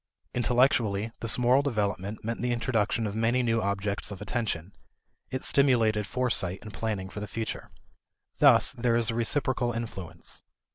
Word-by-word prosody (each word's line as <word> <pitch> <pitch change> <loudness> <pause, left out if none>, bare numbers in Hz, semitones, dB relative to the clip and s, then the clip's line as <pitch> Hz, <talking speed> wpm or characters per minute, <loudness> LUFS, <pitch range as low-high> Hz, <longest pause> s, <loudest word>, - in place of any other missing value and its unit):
Intellectually, 120 -4 +2
this 115 -1 +1
moral 125 +2 +4
development 105 -6 -2
meant 115 +1 -3
the 125 0 0
introduction 115 -1 0
of 100 - -3
many 115 +3 +1
new 115 -1 +1
objects 100 +1 -2
of 100 -2 -7
attention; 105 -4 -3 0.6
it 130 - -4
stimulated 115 -7 +3
foresight 105 -8 -1
and 105 - -9
planning 95 -1 -3
for 105 - -7
the 105 - -5
future. 110 +2 -5 0.7
Thus - - +6
there 120 -1 +1
is 115 -1 +2
a - - -4
reciprocal 120 0 +1
influence. 110 -7 -5
115 Hz, 150 wpm, -28 LUFS, 105-120 Hz, 0.7 s, Thus